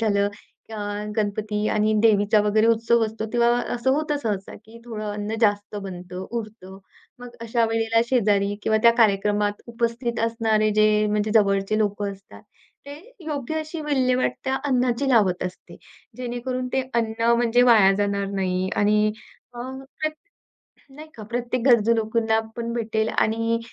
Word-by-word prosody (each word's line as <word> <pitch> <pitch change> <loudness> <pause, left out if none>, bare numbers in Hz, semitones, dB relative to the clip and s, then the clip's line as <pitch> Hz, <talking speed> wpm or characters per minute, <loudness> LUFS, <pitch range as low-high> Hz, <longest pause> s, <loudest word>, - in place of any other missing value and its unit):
झालं 205 -2 +2 0.4
अ, 220 - -6 0.4
गणपती 210 0 -1
आणि 215 0 +1
देवीचा 210 -1 +4
वगैरे 215 +1 +2
उत्सव 230 +1 +3
असतो, 220 0 -5
तेव्हा 235 -1 +3 0.2
असं 245 +2 0
होतं 300 0 -1
सहसा, 200 -4 -3
की 225 +2 -14
थोडं 220 -3 -6
अन्न 205 +1 -4
जास्त 205 -2 +1
बनतं, 180 -1 -7
उरतं 215 -4 -7 0.4
मग 245 -1 -11
अशा 230 0 0
वेळेला 225 0 +1
शेजारी 205 -5 +1
किंवा 220 - +2
त्या 235 - +8
कार्यक्रमात 205 -1 +2
उपस्थित 235 0 -2
असणारे 225 -2 +1
जे 215 - +6 0.2
म्हणजे 210 0 0
जवळचे 200 0 +2
लोकं 205 -1 -1
असतात, 195 0 -15 0.4
ते 285 - -7 0.3
योग्य 295 -1 -3
अशी 310 +1 -6
विल्हेवाट 255 -4 +1
त्या 265 0 0
अन्नाची 255 -1 +1
लावत 190 -7 +3
असते, 180 0 -8 0.4
जेणेकरून 250 +1 -4
ते 265 - +1
अन्न 230 0 +1
म्हणजे 240 +1 +3
वाया 220 -6 +6
जाणार 200 -1 0
नाही. 185 -1 -1
आणि 210 +1 +3 0.5
अं, 260 +2 -7 0.2
प्र 310 - +2 0.9
नाही 305 +2 -11
का, 220 - -9
प्रत्येक 240 +3 -3
गरजू 230 -2 +5
लोकांना 220 0 +1 0.2
पण 235 0 -3
भेटेल 220 -2 -1
आणि 230 +1 +1
225 Hz, 145 wpm, -23 LUFS, 205-240 Hz, 0.9 s, त्या